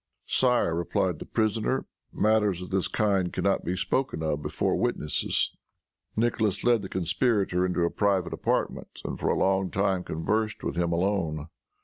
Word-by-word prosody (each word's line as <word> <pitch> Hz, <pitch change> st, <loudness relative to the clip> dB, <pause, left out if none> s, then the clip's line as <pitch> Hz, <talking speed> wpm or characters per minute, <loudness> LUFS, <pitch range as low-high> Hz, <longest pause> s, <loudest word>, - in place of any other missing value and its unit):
"Sire," 125 Hz, -9 st, +3 dB
replied 85 Hz, 0 st, 0 dB
the -, -, -8 dB
prisoner, 110 Hz, +3 st, 0 dB, 0.3 s
"matters 105 Hz, -4 st, +2 dB
of 90 Hz, -, -9 dB
this 95 Hz, -1 st, +1 dB
kind 100 Hz, -4 st, +1 dB
can -, -, -3 dB
not 100 Hz, 0 st, +2 dB
be 90 Hz, -, -1 dB
spoken 100 Hz, -1 st, -1 dB
of 75 Hz, -1 st, -1 dB
before -, -, 0 dB
witnesses." 75 Hz, -1 st, 0 dB, 0.6 s
Nicholas 110 Hz, -3 st, +1 dB
led 120 Hz, -2 st, +4 dB
the 95 Hz, -, -7 dB
conspirator 95 Hz, 0 st, +1 dB
into 90 Hz, -1 st, +1 dB
a 85 Hz, -, 0 dB
private 95 Hz, -4 st, +1 dB
apartment, -, -, -2 dB
and -, -, -4 dB
for -, -, 0 dB
a -, -, +2 dB
long 95 Hz, -1 st, +2 dB
time 95 Hz, -1 st, 0 dB
conversed 105 Hz, +8 st, -1 dB
with -, -, -2 dB
him 85 Hz, 0 st, 0 dB
alone. 85 Hz, -4 st, 0 dB
95 Hz, 160 wpm, -27 LUFS, 85-110 Hz, 0.6 s, led